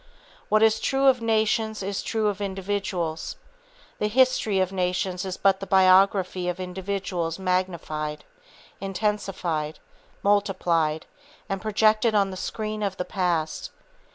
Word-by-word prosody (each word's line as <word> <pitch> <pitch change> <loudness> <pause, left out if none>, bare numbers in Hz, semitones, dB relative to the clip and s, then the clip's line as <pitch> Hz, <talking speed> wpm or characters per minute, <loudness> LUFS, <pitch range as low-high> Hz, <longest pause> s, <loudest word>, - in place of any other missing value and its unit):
What 215 +1 +4
is 220 0 +4
true 270 0 +1
of 260 -3 +5
nations 220 -1 +1
is 195 0 -2
true 220 -2 -1
of 205 0 -2
individuals. 190 -4 -3 0.6
The 210 - +1
history 230 -4 +3
of 185 0 +1
nations 180 0 -1
is 185 -1 -4
but 195 -1 +3
the 195 - -6
biography 185 -1 +4
of 180 +1 -4
individuals 185 -2 -3
magnified, 175 -5 -2 0.6
intensified, 195 -6 -2 0.5
multiplied, 180 -6 +1 0.4
and 195 -1 -3
projected 215 +1 +3
on 200 -2 +3
the - - -6
screen 215 +2 -4
of 195 -2 -2
the 180 - -2
past. 175 -5 -1
195 Hz, 125 wpm, -25 LUFS, 180-210 Hz, 0.6 s, of